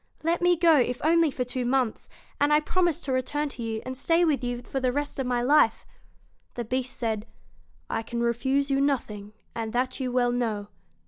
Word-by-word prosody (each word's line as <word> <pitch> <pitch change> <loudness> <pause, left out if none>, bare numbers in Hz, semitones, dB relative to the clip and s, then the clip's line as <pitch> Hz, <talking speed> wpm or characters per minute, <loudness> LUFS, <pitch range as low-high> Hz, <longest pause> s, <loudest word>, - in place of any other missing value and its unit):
Let 335 +2 +1
me 355 0 +4
go, 330 -2 +5
if 250 -1 +1
only 330 0 +4
for 260 -2 -2
two 250 +1 -3
months, 245 -2 0 0.3
and 290 +1 +3
I 300 - +6
promise 345 +1 +1
to 275 - -3
return 290 +3 -1
to 255 - -9
you, 225 -1 -3
and 255 0 -5
stay 330 +6 +2
with 290 -5 +1
you 245 0 -3
the 260 0 -1
rest 290 +1 -3
of 265 - -1
my 245 -1 0
life.' 255 -4 +3 0.7
The 240 - -3
Beast 255 +3 -3
said: 220 -2 -2 0.6
'I 225 - -2
can 235 +1 -4
refuse 265 +4 0
you 275 0 +2
nothing, 215 -7 -2 0.2
and 225 -1 -4
that 255 +3 -1
you 255 -2 -2
well 245 -1 +2
know. 220 -4 -2
255 Hz, 200 wpm, -26 LUFS, 240-290 Hz, 0.7 s, I